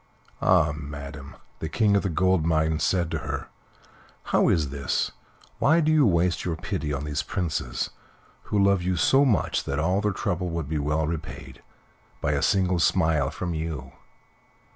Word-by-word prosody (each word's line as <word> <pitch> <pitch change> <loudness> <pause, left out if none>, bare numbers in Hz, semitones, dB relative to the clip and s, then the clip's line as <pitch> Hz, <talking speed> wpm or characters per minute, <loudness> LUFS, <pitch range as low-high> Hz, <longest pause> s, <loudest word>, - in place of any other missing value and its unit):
"Ah! 80 -5 +4
madam," 70 -1 -8 0.2
the 80 - -4
King 105 +2 +2
of 100 - +3
the 95 - -1
Gold 95 0 +2
Mines 80 -1 +1
said 85 -3 +1
to - - -1
her - - -5 0.7
"how - - +2
is 75 -5 +1
this? 70 0 -1 0.5
Why 160 +4 +4
do 155 -1 +2
you 150 -5 +5
waste 85 -1 +1
your 85 -2 -2
pity 80 -3 -3
on 70 0 -2
these 75 0 -2
princes, 85 -6 -3 0.5
who 105 - -1
love 100 -2 +4
you 90 +1 0
so 135 +10 +4
much 115 -8 +1
that 70 - -2
all 90 +6 +1
their 105 0 +1
trouble 90 -4 -2
would 85 -4 -3
be 80 0 -2
well 75 +2 0
repaid 80 0 -6 0.6
by - - 0
a - - 0
single 95 -2 +2
smile 80 -5 +2
from 90 -2 -4
you?" 80 -5 -4
85 Hz, 170 wpm, -25 LUFS, 75-95 Hz, 0.7 s, you